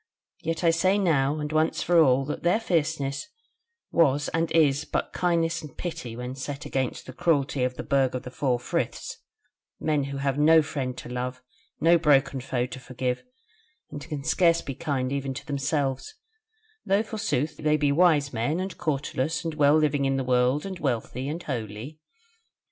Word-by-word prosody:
Yet 165 Hz, +2 st, -3 dB
I 165 Hz, -, +5 dB
say 185 Hz, +4 st, +2 dB
now 150 Hz, -7 st, +2 dB
and 150 Hz, 0 st, -4 dB
once 155 Hz, +1 st, +1 dB
for 175 Hz, 0 st, +4 dB
all 135 Hz, -3 st, +4 dB
that 150 Hz, -, -4 dB
their 175 Hz, +6 st, +3 dB
fierceness 155 Hz, -, -1 dB, 0.6 s
was 145 Hz, -3 st, +3 dB
and 165 Hz, 0 st, -1 dB
is 150 Hz, -3 st, +3 dB
but -, -, -3 dB
kindness 170 Hz, -2 st, +1 dB
and 150 Hz, -4 st, -11 dB
pity 125 Hz, -9 st, -5 dB
when 125 Hz, +1 st, -5 dB
set 140 Hz, +1 st, -6 dB
against 130 Hz, -2 st, -2 dB
the 130 Hz, -, -9 dB
cruelty 140 Hz, -3 st, +1 dB
of 125 Hz, 0 st, -1 dB
the -, -, -5 dB
Burg 135 Hz, -2 st, +1 dB
of 130 Hz, -, -4 dB
the 125 Hz, -, -8 dB
Four 130 Hz, -3 st, 0 dB
Friths; 120 Hz, -, -3 dB, 0.6 s
men 150 Hz, -3 st, 0 dB
who 140 Hz, 0 st, -5 dB
have 140 Hz, 0 st, -1 dB
no 160 Hz, +1 st, +6 dB
friend 130 Hz, -4 st, -4 dB
to -, -, -8 dB
love, 125 Hz, +1 st, -4 dB, 0.4 s
no 170 Hz, +1 st, +5 dB
broken 140 Hz, -3 st, +3 dB
foe 125 Hz, -1 st, -1 dB
to 130 Hz, -, -8 dB
forgive, 125 Hz, 0 st, -3 dB, 0.7 s
and 145 Hz, -, -6 dB
can 145 Hz, -1 st, -6 dB
scarce 170 Hz, +2 st, +3 dB
be 135 Hz, -, -4 dB
kind 135 Hz, -3 st, -2 dB
even 135 Hz, -1 st, -3 dB
to 140 Hz, +2 st, -7 dB
themselves: 140 Hz, -2 st, -2 dB, 0.7 s
though 200 Hz, +3 st, +2 dB
forsooth 160 Hz, -, -2 dB
they 150 Hz, 0 st, +2 dB
be 145 Hz, -1 st, +2 dB
wise 150 Hz, -3 st, +3 dB
men 120 Hz, +9 st, 0 dB
and 190 Hz, +1 st, -5 dB
cautelous 145 Hz, +1 st, -1 dB
and 165 Hz, -, -2 dB
well 145 Hz, 0 st, +4 dB
living 150 Hz, -2 st, +2 dB
before 135 Hz, 0 st, +1 dB
the 135 Hz, -, -1 dB
world, 125 Hz, +4 st, +2 dB
and 190 Hz, -2 st, -6 dB
wealthy 130 Hz, -1 st, -2 dB
and 165 Hz, +3 st, -4 dB
holy." 120 Hz, +3 st, -5 dB
145 Hz, 180 wpm, -26 LUFS, 130-160 Hz, 0.7 s, no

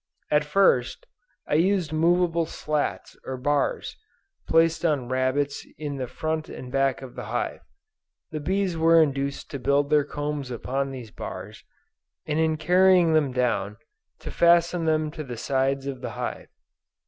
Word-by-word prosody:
At 150 Hz, 0 st, +4 dB
first, 150 Hz, -, +2 dB, 0.4 s
I -, -, -3 dB
used 175 Hz, 0 st, +2 dB
movable 170 Hz, 0 st, +2 dB
slats 150 Hz, -2 st, -3 dB
or 130 Hz, -, -5 dB
bars 145 Hz, +2 st, -1 dB, 0.5 s
placed 165 Hz, 0 st, +3 dB
on 145 Hz, -7 st, 0 dB
rabbets 130 Hz, +2 st, 0 dB
in 145 Hz, -2 st, -4 dB
the 130 Hz, -2 st, -3 dB
front 155 Hz, +4 st, -3 dB
and 125 Hz, -, -8 dB
back 135 Hz, 0 st, +1 dB
of 130 Hz, -, -9 dB
the -, -, -7 dB
hive. -, -, -3 dB, 0.7 s
The 155 Hz, -, -3 dB
bees 185 Hz, +3 st, 0 dB
were 165 Hz, +1 st, +5 dB
induced 140 Hz, -2 st, 0 dB
to 140 Hz, -, -4 dB
build 140 Hz, +3 st, +1 dB
their 150 Hz, -1 st, +5 dB
combs 145 Hz, -2 st, -4 dB
upon 135 Hz, +3 st, -2 dB
these 125 Hz, -5 st, -8 dB
bars, -, -, -8 dB, 0.6 s
and 155 Hz, 0 st, -1 dB
in 160 Hz, -1 st, +2 dB
carrying 180 Hz, +1 st, +4 dB
them 150 Hz, -4 st, +2 dB
down, 110 Hz, -5 st, -1 dB, 0.4 s
to -, -, -6 dB
fasten 170 Hz, 0 st, +3 dB
them 155 Hz, -1 st, +1 dB
to 155 Hz, -1 st, -6 dB
the 125 Hz, -4 st, -7 dB
sides 135 Hz, +2 st, 0 dB
of 135 Hz, -2 st, -5 dB
the -, -, -4 dB
hive. -, -, -4 dB
150 Hz, 155 wpm, -25 LUFS, 135-165 Hz, 0.7 s, were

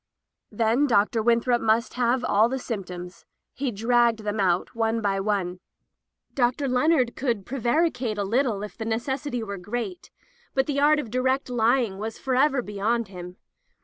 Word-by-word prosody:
'* -, -, -61 dB
Then 230 Hz, +6 st, +2 dB
Dr. 220 Hz, -1 st, +2 dB
Winthrop 235 Hz, +1 st, +2 dB
must 225 Hz, +2 st, +1 dB
have 250 Hz, +1 st, +1 dB
all 215 Hz, +3 st, +3 dB
the 265 Hz, -, -2 dB
symptoms. 180 Hz, -7 st, -7 dB, 0.3 s
He 275 Hz, -1 st, -2 dB
dragged 230 Hz, +1 st, +2 dB
them 210 Hz, 0 st, -2 dB
out, 180 Hz, -2 st, +1 dB
one 225 Hz, 0 st, 0 dB
by 200 Hz, -3 st, 0 dB
one. 195 Hz, -3 st, -1 dB, 0.7 s
Dr. 255 Hz, +2 st, +1 dB
Leonard 255 Hz, -1 st, +2 dB
could 235 Hz, -7 st, -2 dB
prevaricate 250 Hz, -2 st, 0 dB
a 205 Hz, -, 0 dB
litde 225 Hz, -2 st, 0 dB
if 210 Hz, -, -12 dB
the 220 Hz, -, -6 dB
necessity 245 Hz, +2 st, -2 dB
were 200 Hz, -3 st, -6 dB
great, 245 Hz, -, -5 dB, 0.5 s
but 265 Hz, 0 st, +3 dB
the 280 Hz, -1 st, -1 dB
art 300 Hz, +2 st, +5 dB
of 245 Hz, -7 st, -5 dB
direct 260 Hz, +1 st, 0 dB
ly 245 Hz, +2 st, +3 dB
ing 195 Hz, -4 st, -5 dB
was 220 Hz, +1 st, -5 dB
forever 265 Hz, 0 st, +1 dB
beyond 210 Hz, +2 st, -1 dB
him. 180 Hz, -1 st, -9 dB
230 Hz, 165 wpm, -25 LUFS, 210-260 Hz, 0.7 s, art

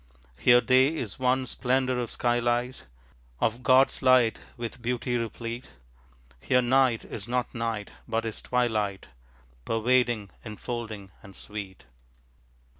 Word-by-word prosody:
Here 120 Hz, 0 st, +6 dB
day 130 Hz, +5 st, +4 dB
is 115 Hz, -7 st, -5 dB
one 130 Hz, 0 st, +2 dB
splendor 130 Hz, 0 st, 0 dB
of 120 Hz, -2 st, -3 dB
sky 120 Hz, 0 st, +1 dB
light 120 Hz, +1 st, -1 dB, 0.5 s
Of 115 Hz, +2 st, 0 dB
God's 130 Hz, +2 st, +4 dB
light 130 Hz, -3 st, +4 dB, 0.2 s
with 120 Hz, 0 st, -6 dB
beauty 120 Hz, +1 st, -1 dB
replete. 115 Hz, +1 st, -4 dB, 0.7 s
Here 125 Hz, -, +2 dB
night 130 Hz, -2 st, +3 dB
is 105 Hz, +1 st, -7 dB
not 125 Hz, 0 st, -1 dB
night, 115 Hz, -3 st, -3 dB, 0.2 s
but 115 Hz, -1 st, -1 dB
is 110 Hz, -, -5 dB
twilight, 110 Hz, -6 st, -1 dB, 0.5 s
Pervading, 115 Hz, -, +1 dB
enfolding 110 Hz, -2 st, -6 dB
and 100 Hz, -3 st, -14 dB
sweet. 100 Hz, -3 st, -8 dB
120 Hz, 120 wpm, -27 LUFS, 110-125 Hz, 0.7 s, Here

